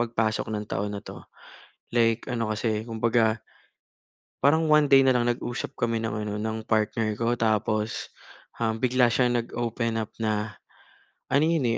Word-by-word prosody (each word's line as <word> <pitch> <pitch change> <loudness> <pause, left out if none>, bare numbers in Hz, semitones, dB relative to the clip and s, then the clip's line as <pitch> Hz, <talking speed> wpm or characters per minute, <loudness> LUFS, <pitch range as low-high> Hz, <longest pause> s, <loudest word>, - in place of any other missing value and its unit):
pagpasok 115 -2 0
ng 105 -1 -3
taon 105 +1 -2
na 100 - -5
ito. - - -10 0.7
Like 115 -1 +2
ano 115 -3 -1
kasi 110 0 -1
kumbaga 115 -1 +1 1.1
parang 160 +3 +4
1 150 -1 +6
day 135 - +9
na 130 -1 +4
lang 120 - +1
nag-usap 120 0 -4
kami 115 -1 0
ng 110 -2 -2
ano 105 - -3
ng 110 +1 -4
partner 110 0 +1
ko 115 +1 +1
tapos, 110 0 0 0.5
um, 110 -1 0
bigla 125 -1 +4
siyang 120 0 +2
nag-open 115 -1 -2
up 110 -2 -3
na, 105 -1 -2 0.7
ano 140 +2 +4
iyon, 165 -6 +1
115 Hz, 155 wpm, -26 LUFS, 110-120 Hz, 1.1 s, day